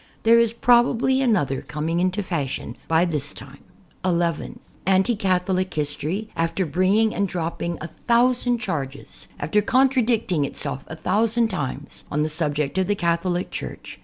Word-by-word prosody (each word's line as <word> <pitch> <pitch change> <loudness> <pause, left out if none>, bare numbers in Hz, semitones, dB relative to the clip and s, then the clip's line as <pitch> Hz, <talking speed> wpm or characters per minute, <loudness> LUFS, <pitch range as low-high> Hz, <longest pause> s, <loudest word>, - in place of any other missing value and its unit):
There 230 +1 +6
is 230 -1 +3
probably 245 +2 +3
another 180 - +1
com 150 +1 -5
ing 165 +1 0
into 185 +3 0
fashion 145 -9 -3
by 165 +2 +3
this 150 -4 -3
time. 140 +1 -12 0.4
(11) 170 -3 -1 0.3
Anti 190 +5 +3
Catholic 185 -1 0
history, 155 +7 -2
after 165 +3 0
bringing 190 +8 +2
and 200 - 0
drop 170 -2 -3
ping 170 -1 -2
a 155 - -4 0.2
thousand 245 0 +3
charges, 145 - -5
after 160 +9 +1
contradicting 235 - +2
itself 140 -1 -4
a 160 - -7
thousand 225 +7 +1
times, 145 -6 -4
on 150 +1 +1
the 155 - 0
subject 150 0 0
of 185 - +1
the 205 - +1
Catholic 175 0 -1
Church. - - -7
180 Hz, 155 wpm, -23 LUFS, 155-220 Hz, 0.4 s, There